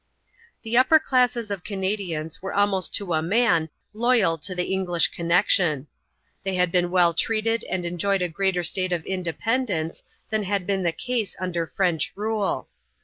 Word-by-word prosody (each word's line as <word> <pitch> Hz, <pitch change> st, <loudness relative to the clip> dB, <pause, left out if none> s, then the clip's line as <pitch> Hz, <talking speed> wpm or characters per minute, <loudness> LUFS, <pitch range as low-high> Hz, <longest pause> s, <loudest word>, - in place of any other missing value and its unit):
The 230 Hz, +2 st, +2 dB
upper 260 Hz, +5 st, +6 dB
classes 250 Hz, -6 st, +1 dB
of 195 Hz, -3 st, -4 dB
Canadians 190 Hz, -6 st, -3 dB
were 195 Hz, -, -5 dB
almost 200 Hz, -2 st, +2 dB
to 190 Hz, -4 st, -2 dB
a 155 Hz, -, +1 dB
man 175 Hz, -3 st, +2 dB, 0.2 s
loyal 220 Hz, -7 st, +2 dB
to 180 Hz, +5 st, -5 dB
the 180 Hz, -, 0 dB
English 180 Hz, -3 st, +2 dB
connection. 170 Hz, -4 st, +2 dB, 0.6 s
They 195 Hz, -1 st, -2 dB
had 180 Hz, -1 st, +1 dB
been 175 Hz, -1 st, +2 dB
well 175 Hz, -2 st, +3 dB
treated 225 Hz, +5 st, 0 dB
and 180 Hz, -1 st, -3 dB
enjoyed 180 Hz, +2 st, 0 dB
a -, -, +1 dB
greater 185 Hz, +1 st, -1 dB
state 185 Hz, +2 st, +1 dB
of 165 Hz, -2 st, -3 dB
independence 185 Hz, -, -2 dB, 0.3 s
than 220 Hz, -1 st, +1 dB
had 195 Hz, -1 st, -1 dB
been 195 Hz, 0 st, 0 dB
the 170 Hz, -2 st, +1 dB
case 235 Hz, +3 st, -3 dB
under 175 Hz, -3 st, -2 dB
French 175 Hz, -5 st, 0 dB
rule. 210 Hz, -9 st, -2 dB
190 Hz, 160 wpm, -24 LUFS, 170-210 Hz, 0.6 s, upper